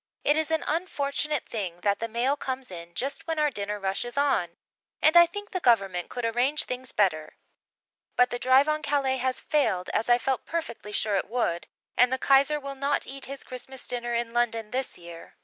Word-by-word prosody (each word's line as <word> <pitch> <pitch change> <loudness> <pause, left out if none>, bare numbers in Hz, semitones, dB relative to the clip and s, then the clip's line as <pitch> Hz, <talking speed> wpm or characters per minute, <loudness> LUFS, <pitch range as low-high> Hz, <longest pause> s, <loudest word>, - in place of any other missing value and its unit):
It 295 - +4
is 315 0 0
an 320 0 +1
unfortunate 300 -3 -1
thing 180 -6 -4
that 200 +1 +1
the 230 - -2
mail 240 +5 +1
comes 260 -5 -5
in 170 -1 -9
just 280 +6 -3
when 325 -1 -1
our 300 -1 +2
dinner 205 -1 -4
rush 195 0 -1
is 240 +2 -8
on, 180 -12 +1 0.4
and 315 - +4
I 345 0 +9
think 410 +4 -8
the 370 - -1
Government 195 - +2
could 245 -2 -4
arrange 245 +6 +2
things 255 0 -5
better. 155 -7 0 0.8
But 250 0 +4
the 245 - -3
drive 260 +3 +5
on 305 0 0
Calais 275 -3 +1
has 255 0 -1
failed, 215 -12 0
as 225 - 0
I 240 - +6
felt 265 +1 -2
perfectly 275 -10 -4
sure 210 -1 +1
it 195 - -2
would, 195 -8 -1 0.3
and 250 +1 +5
the 260 - +1
Kaiser 275 +3 +4
will 275 -1 -6
not 280 +1 -1
eat 270 0 -7
his 275 +1 -6
Christmas 255 +1 -7
dinner 240 -1 -2
in 235 0 -2
London 230 -2 0
this 260 +1 -2
year. 170 -1 -12
255 Hz, 205 wpm, -27 LUFS, 215-285 Hz, 0.8 s, I